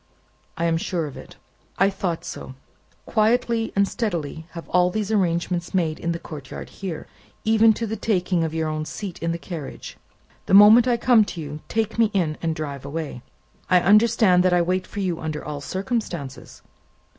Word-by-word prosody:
"I 165 Hz, -, 0 dB
am 165 Hz, -1 st, +2 dB
sure 170 Hz, 0 st, -2 dB
of 145 Hz, -, -8 dB
it." -, -, -11 dB, 0.4 s
"I 195 Hz, +2 st, +3 dB
thought 180 Hz, -4 st, -3 dB
so. 130 Hz, -, -7 dB, 0.5 s
Quietly 230 Hz, +1 st, +1 dB
and 200 Hz, 0 st, +3 dB
steadily 165 Hz, -8 st, -3 dB
have 170 Hz, -1 st, -8 dB
all 180 Hz, 0 st, +3 dB
these 215 Hz, +2 st, -2 dB
arrangements 175 Hz, -3 st, 0 dB
made 160 Hz, -4 st, 0 dB
in 170 Hz, -, -2 dB
the 170 Hz, -, -2 dB
courtyard 150 Hz, -5 st, -9 dB
here, 185 Hz, -6 st, -6 dB, 0.4 s
even 220 Hz, 0 st, +5 dB
to 230 Hz, -, -3 dB
the 220 Hz, 0 st, -3 dB
taking 185 Hz, -6 st, 0 dB
of 160 Hz, -, -1 dB
your 160 Hz, 0 st, -1 dB
own 155 Hz, 0 st, -3 dB
seat 195 Hz, +2 st, -7 dB
in 165 Hz, -, 0 dB
the 170 Hz, -, -2 dB
carriage. 165 Hz, -4 st, -8 dB, 0.5 s
The -, -, +4 dB
moment 215 Hz, +4 st, +8 dB
I 240 Hz, -1 st, +3 dB
come 235 Hz, -2 st, +5 dB
to 175 Hz, -, -7 dB
you, 150 Hz, -1 st, -6 dB
take 225 Hz, 0 st, -2 dB
me 225 Hz, -2 st, +5 dB
in, 165 Hz, -5 st, +1 dB
and 165 Hz, -1 st, -1 dB
drive 145 Hz, -4 st, -5 dB
away." 140 Hz, -3 st, -5 dB, 0.5 s
"I 180 Hz, 0 st, +6 dB
understand 210 Hz, -1 st, +5 dB
that 185 Hz, 0 st, +3 dB
I 175 Hz, -, +4 dB
wait 185 Hz, +2 st, -1 dB
for 205 Hz, -, -5 dB
you 180 Hz, -3 st, -1 dB
under 155 Hz, -1 st, -4 dB
all 150 Hz, -1 st, -5 dB
circumstances?" 185 Hz, -, -4 dB
180 Hz, 185 wpm, -23 LUFS, 160-210 Hz, 0.5 s, moment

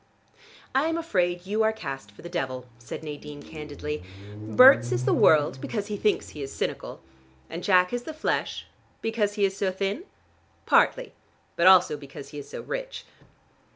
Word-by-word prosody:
"I 275 Hz, +4 st, +2 dB
am 325 Hz, 0 st, 0 dB
afraid 180 Hz, -, 0 dB
you 210 Hz, +3 st, 0 dB
are 220 Hz, 0 st, +4 dB
cast 135 Hz, -, -7 dB
for 100 Hz, -, -16 dB
the -, -, -6 dB
devil," 130 Hz, -8 st, -3 dB
said 115 Hz, -, -8 dB
Nadine 145 Hz, -1 st, -8 dB
candidly. 150 Hz, -1 st, -6 dB, 0.3 s
"Berts 120 Hz, -, +6 dB
is 120 Hz, +1 st, 0 dB
the 130 Hz, -, +3 dB
world 145 Hz, -3 st, +4 dB
because 205 Hz, -, -3 dB
he 210 Hz, -, -2 dB
thinks 210 Hz, +1 st, 0 dB
he 150 Hz, -, -9 dB
is 135 Hz, 0 st, -5 dB
cynical. -, -, -4 dB, 0.5 s
And 170 Hz, +2 st, -5 dB
Jack 180 Hz, +1 st, +4 dB
is 245 Hz, -, -1 dB
the 280 Hz, -, -7 dB
flesh 310 Hz, 0 st, -2 dB, 0.2 s
" -, -, -36 dB
"Because 220 Hz, -2 st, 0 dB
he 205 Hz, -2 st, +3 dB
is 195 Hz, 0 st, -1 dB
so 195 Hz, -1 st, 0 dB
thin?" 200 Hz, -, -3 dB, 0.6 s
"Partly. -, -, +3 dB, 0.4 s
But 170 Hz, -, +4 dB
also 180 Hz, -5 st, +6 dB
because 140 Hz, -1 st, -10 dB
he 145 Hz, -, -8 dB
is 145 Hz, -, -10 dB
so -, -, -6 dB
rich." -, -, -5 dB
180 Hz, 180 wpm, -26 LUFS, 145-220 Hz, 0.6 s, Berts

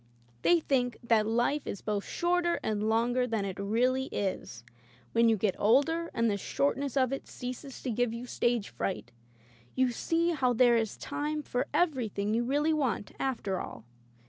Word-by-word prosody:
They 345 Hz, -, +5 dB
think 250 Hz, -6 st, 0 dB
that 225 Hz, -2 st, +3 dB
life 240 Hz, +6 st, +1 dB
is 200 Hz, -, -4 dB
both 205 Hz, -2 st, -2 dB
shorter 345 Hz, 0 st, +1 dB
and 215 Hz, 0 st, 0 dB
longer 240 Hz, +3 st, +2 dB
than 220 Hz, -4 st, -1 dB
it 195 Hz, -1 st, -5 dB
really 250 Hz, +6 st, +1 dB
is. 185 Hz, -, -4 dB, 0.5 s
When 230 Hz, 0 st, +4 dB
you 220 Hz, -, +3 dB
get 195 Hz, -1 st, 0 dB
older 305 Hz, +10 st, +3 dB
and 230 Hz, 0 st, +1 dB
the 205 Hz, -2 st, +1 dB
short 140 Hz, -6 st, 0 dB
ness 280 Hz, -1 st, -3 dB
of 260 Hz, -1 st, +2 dB
it 275 Hz, -, -5 dB
ceases 255 Hz, +1 st, -7 dB
to 255 Hz, -, -1 dB
give 245 Hz, +1 st, +1 dB
you 235 Hz, +2 st, -6 dB
stage 240 Hz, -3 st, 0 dB
fright, 190 Hz, -, -4 dB, 0.6 s
you 260 Hz, -1 st, +2 dB
see 335 Hz, +8 st, +1 dB
how 260 Hz, -6 st, +1 dB
there 240 Hz, 0 st, +5 dB
is 225 Hz, -2 st, 0 dB
time 300 Hz, +1 st, -3 dB
for 250 Hz, -2 st, -2 dB
everything 225 Hz, -, 0 dB
you 235 Hz, +2 st, +2 dB
really 290 Hz, +5 st, +1 dB
want, 255 Hz, -9 st, -1 dB
after 225 Hz, -8 st, -1 dB
all.' 110 Hz, -, -8 dB
245 Hz, 175 wpm, -30 LUFS, 215-275 Hz, 0.6 s, They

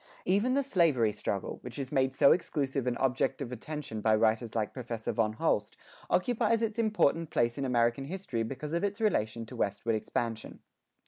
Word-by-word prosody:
Even 205 Hz, +8 st, +2 dB
the 280 Hz, -, +2 dB
slavery 160 Hz, -, +3 dB
struggle, 100 Hz, -1 st, -3 dB
which 125 Hz, -1 st, -8 dB
is 135 Hz, -2 st, -4 dB
made 130 Hz, 0 st, +2 dB
so 140 Hz, 0 st, +6 dB
exclusive 140 Hz, -6 st, 0 dB
an 120 Hz, -, 0 dB
object 130 Hz, 0 st, 0 dB
of 130 Hz, -4 st, -5 dB
attention 125 Hz, -3 st, -5 dB
by 110 Hz, 0 st, +4 dB
writers 110 Hz, +1 st, +1 dB
like 110 Hz, -2 st, -1 dB
Professor 120 Hz, -3 st, -4 dB
von 110 Hz, -2 st, +1 dB
Holst, -, -, 0 dB, 0.3 s
occupies 230 Hz, +2 st, +2 dB
its 225 Hz, 0 st, -2 dB
important 170 Hz, -8 st, +2 dB
place 120 Hz, 0 st, +1 dB
in 140 Hz, -, -2 dB
American 120 Hz, +1 st, +1 dB
history 170 Hz, -8 st, -4 dB
because 135 Hz, +7 st, -4 dB
of 170 Hz, -, 0 dB
its 205 Hz, +2 st, -1 dB
relation 115 Hz, -, 0 dB
to -, -, -10 dB
westward 105 Hz, +3 st, -1 dB
expansion. 110 Hz, +1 st, -3 dB
130 Hz, 180 wpm, -30 LUFS, 115-170 Hz, 0.3 s, so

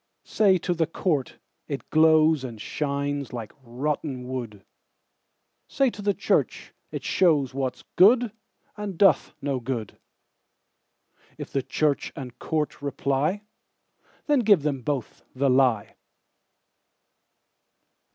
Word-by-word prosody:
Say 195 Hz, -3 st, +3 dB
to 175 Hz, +1 st, -1 dB
the 165 Hz, -2 st, 0 dB
court, 155 Hz, -5 st, -1 dB, 0.3 s
it 140 Hz, -2 st, -5 dB
glowsAnd 155 Hz, -6 st, +4 dB
shines 140 Hz, +2 st, -3 dB
like 115 Hz, -4 st, -6 dB
rotten 130 Hz, +1 st, -3 dB
wood; 120 Hz, -6 st, -6 dB, 1.0 s
Say 270 Hz, -2 st, +1 dB
to 210 Hz, -, -9 dB
the 205 Hz, -1 st, +1 dB
church, -, -, 0 dB, 0.2 s
it -, -, -5 dB
showsWhat's 140 Hz, -7 st, +1 dB
good, 230 Hz, +4 st, +6 dB, 0.4 s
and 205 Hz, -4 st, -5 dB
doth 190 Hz, -7 st, +3 dB
no 140 Hz, -2 st, -1 dB
good:If 115 Hz, -3 st, -11 dB
church 145 Hz, +1 st, 0 dB
and 130 Hz, -6 st, -8 dB
court 150 Hz, -3 st, -2 dB
reply, 140 Hz, +7 st, -1 dB, 0.8 s
Then 295 Hz, -2 st, +3 dB
give 205 Hz, -, +4 dB
them 140 Hz, -3 st, -1 dB
both 135 Hz, -3 st, -4 dB
the 135 Hz, 0 st, +2 dB
lie. 125 Hz, -5 st, +2 dB
145 Hz, 105 wpm, -25 LUFS, 130-170 Hz, 1.0 s, good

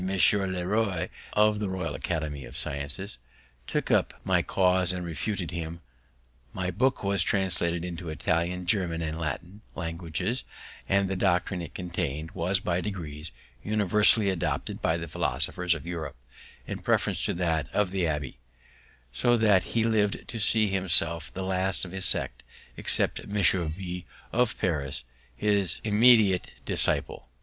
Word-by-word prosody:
le 95 Hz, +1 st, -1 dB, 0.5 s
Roy, 100 Hz, -3 st, 0 dB, 0.2 s
of 105 Hz, 0 st, +3 dB
the 105 Hz, -2 st, -2 dB
Royal 95 Hz, -3 st, -3 dB
Academy 75 Hz, -5 st, -3 dB
of -, -, -9 dB
Sciences, 70 Hz, +3 st, -4 dB, 0.5 s
took -, -, -1 dB
up -, -, +2 dB
my -, -, +2 dB
cause 90 Hz, -1 st, +2 dB
and 90 Hz, -1 st, -4 dB
refuted 85 Hz, +3 st, -3 dB
him; 85 Hz, 0 st, -5 dB, 0.7 s
my 90 Hz, 0 st, -2 dB
book 125 Hz, +8 st, +1 dB
was 100 Hz, -2 st, +2 dB
translated 85 Hz, -2 st, +1 dB
into 90 Hz, 0 st, -6 dB
the -, -, -4 dB
Italian, 85 Hz, +4 st, -1 dB
German, 85 Hz, -4 st, 0 dB
and 80 Hz, 0 st, -4 dB
Latin 85 Hz, +6 st, -5 dB
languages; 85 Hz, +7 st, -3 dB, 0.5 s
and 100 Hz, 0 st, +3 dB
the 95 Hz, -, -2 dB
doctrine 90 Hz, -1 st, +1 dB
it 80 Hz, -5 st, -9 dB
contain'd 80 Hz, -3 st, -3 dB
was 90 Hz, +2 st, 0 dB
by 90 Hz, -2 st, -1 dB
degrees 80 Hz, -7 st, -5 dB, 0.3 s
universally 105 Hz, 0 st, +5 dB
adopted 90 Hz, -3 st, -3 dB
by 80 Hz, -, +1 dB
the 85 Hz, 0 st, -5 dB
philosophers 90 Hz, +3 st, +1 dB
of 80 Hz, -, -8 dB
Europe, 85 Hz, -5 st, -5 dB, 0.5 s
in -, -, -5 dB
preference -, -, 0 dB
to -, -, -1 dB
that 80 Hz, -4 st, -1 dB
of 105 Hz, -3 st, +1 dB
the 95 Hz, -2 st, 0 dB
abbé; 75 Hz, -4 st, -3 dB, 0.7 s
so 120 Hz, -, +2 dB
that 105 Hz, -4 st, +4 dB, 0.2 s
he 115 Hz, -, +4 dB
lived 110 Hz, -3 st, +1 dB
to 115 Hz, -, -5 dB
see 110 Hz, 0 st, +3 dB
himself 85 Hz, -4 st, +1 dB
the 95 Hz, -, -5 dB
last 95 Hz, +1 st, 0 dB
of 90 Hz, -, -9 dB
his 95 Hz, -1 st, -2 dB
sect, -, -, +3 dB, 0.3 s
except -, -, +1 dB
Monsieur 95 Hz, -3 st, +3 dB
B, 90 Hz, +2 st, -6 dB, 0.2 s
of 120 Hz, -1 st, +1 dB
Paris, 75 Hz, -8 st, -2 dB, 0.3 s
his 100 Hz, +1 st, +1 dB
élève -, -, -6 dB
and 105 Hz, -, -1 dB
immediate 110 Hz, -5 st, +5 dB
disciple. -, -, +1 dB
90 Hz, 155 wpm, -27 LUFS, 85-100 Hz, 0.7 s, universally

